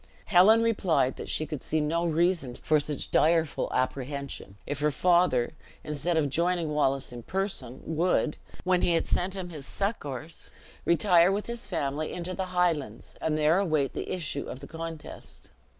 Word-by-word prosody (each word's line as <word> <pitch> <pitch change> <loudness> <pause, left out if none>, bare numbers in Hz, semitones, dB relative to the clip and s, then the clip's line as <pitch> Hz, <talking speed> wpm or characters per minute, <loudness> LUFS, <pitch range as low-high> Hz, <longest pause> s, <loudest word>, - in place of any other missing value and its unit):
Helen 215 +4 +6
replied 180 - +2
that - - -7
she 155 - 0
could 150 -2 -5
see 155 - -1
no 165 +3 0
reason 165 -5 +1
for 155 +3 +2
such 145 -1 -4
direful 160 -1 +2
apprehension, 130 -4 -3
if 145 -1 -4
her 150 +1 +2
father, 170 -5 +3 0.3
instead 150 +3 -1
of 155 -2 +2
joining 170 +1 +1
Wallace 135 -4 0
in 120 - -7
person, 190 - -3
would, 160 -1 +1 0.3
when 185 -1 +2
he 170 - +3
had 165 - +1
sent 185 +2 0
him 180 -2 -5
succors, 155 - -4 0.4
retire 170 +1 +5
with 205 +2 -1
his 235 0 -5
family 155 -4 -2
into 180 +1 -4
the 190 0 -2
Highlands, 170 - -1
and 155 -1 0
there 155 +4 +4
await 155 -8 +1
the - - -4
issue 155 -6 -3
of 130 - -6
the - - -10
contest. 165 -1 -8
160 Hz, 165 wpm, -28 LUFS, 145-180 Hz, 0.4 s, Helen